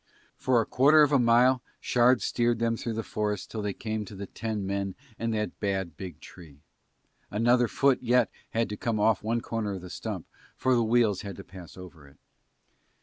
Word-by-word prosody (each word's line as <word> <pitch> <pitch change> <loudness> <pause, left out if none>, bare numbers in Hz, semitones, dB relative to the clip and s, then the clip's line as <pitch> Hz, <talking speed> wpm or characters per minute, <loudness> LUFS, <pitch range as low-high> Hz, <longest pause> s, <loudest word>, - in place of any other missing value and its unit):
For 130 -2 +2
a 115 - +1
quarter 150 +4 +5
of 145 - +2
a 140 - +4
mile 125 +2 +4 0.2
Shard 125 +1 +3
steered 120 -1 +1
them 115 0 0
through 115 0 -4
the 115 - -2
forest 105 -1 -3
till 110 - -4
they 105 -1 -2
came 110 0 -4
to 100 - -10
the 100 +1 -6
ten 110 0 -4
men 100 -1 -2 0.2
and 115 0 -1
that 105 0 -3
bad 95 -5 -2
big 90 -4 -8
tree, 80 -6 -14 0.7
another 120 +3 +3
foot 135 +2 +2
had 125 -1 +3 0.3
yet - - -5
to 105 - -4
come 115 -1 -1
off 105 -1 +3
one 115 +2 -1
corner 110 -3 -3
of 95 - -6
the 90 0 -9
stump - - -5 0.3
for 130 - +1
the 120 - +3
wheels 110 -3 +2
had 100 -1 -7
to 100 - -9
pass 90 -3 -12
over 85 -5 -12
it. 70 - -20
110 Hz, 205 wpm, -28 LUFS, 100-120 Hz, 0.7 s, quarter